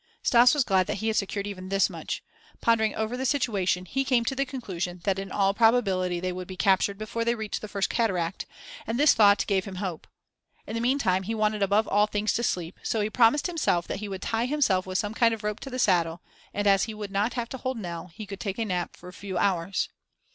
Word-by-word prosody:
Stas 245 +3 +6
was 290 - +3
glad 190 -5 +2
that - - -1
he 220 +2 -1
had 220 - -1
secured 200 0 -1
even 185 -2 -7
this 195 0 +3
much. - - -5 0.4
Pondering 220 -2 +2
over 220 +2 -2
the 255 - -3
situation, 205 -9 0
he 270 +8 -1
came 250 -3 +2
to 270 - 0
the 275 +1 -1
conclusion 185 -9 -5
that 195 -1 0
in 195 -1 -6
all 195 -1 +2
probability 195 -6 +2
they 185 +1 -2
would 180 0 -6
be 185 - -8
captured 195 0 +2
before 215 +2 -3
they 235 +1 +1
reached 220 -2 -4
the 215 - -6
first 200 -1 -1
cataract, 185 -7 -1 0.4
and 225 +2 -1
this 290 +2 +6
thought 205 -2 +5
gave 190 -2 0
him 195 -2 -7
hope. 180 -4 -5 0.6
In - - -7
the 230 - -2
meantime 240 -7 +2
he 220 +4 -3
wanted 215 -1 0
above 205 +3 +2
all 210 +1 +3
things 210 0 0
to - - 0
sleep; 175 -6 -2
so 225 - -1
he 210 +1 -1
promised 245 +5 +4
himself 310 - 0
that - - -3
he 210 -1 -5
would 190 -1 -6
tie 225 +2 0
himself 235 -11 +1
with 185 0 -1
some 205 +2 -2
kind 230 0 +3
of 220 - -14
rope 210 0 -2
to 275 - -7
the 255 - -5
saddle, 175 -7 +1 0.3
and, 205 - -2
as 195 -2 +4
he 220 -1 -7
would 205 -2 -6
not 205 +4 0
have 235 -2 -3
to 265 - -5
hold 260 -1 -3
Nell, 175 -4 -6
he 215 0 -7
could 200 -1 -8
take 195 -3 -4
a 225 - -1
nap 180 -4 -3
for - - -13
a 180 - -10
few 190 -2 -5
hours. 185 0 0
205 Hz, 250 wpm, -27 LUFS, 190-230 Hz, 0.6 s, Stas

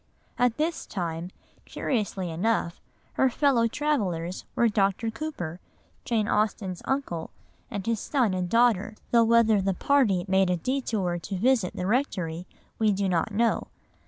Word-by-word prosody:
At 245 -2 +2
this 320 +2 -2
time, 170 -2 -4 0.4
curiously 200 -7 -2
enough, 175 0 -1 0.3
her 265 - +3
fellow 250 -3 +3
travellers 195 - -2
were 235 - +4
Dr. 205 +1 +1
Cooper, 220 - -5 0.5
Jane 220 -3 +1
Austen's 210 -4 -1
uncle, 270 -12 -2 0.4
and 200 -6 -5
his 230 -2 0
son 245 -7 +1
and 180 -1 -2
daughter, 230 -2 +3 0.2
though 235 -1 +6
whether 225 -2 +4
the 195 -1 0
party 215 -8 +2
made 190 0 +3
a 180 - +1
détour 200 -6 -1
to 195 +1 -4
visit 225 -2 +2
the 180 - -3
rectory 185 - -1 0.3
we 220 -2 +3
do 195 0 0
not 180 +2 0
know. 230 +3 +1
210 Hz, 145 wpm, -27 LUFS, 180-235 Hz, 0.5 s, though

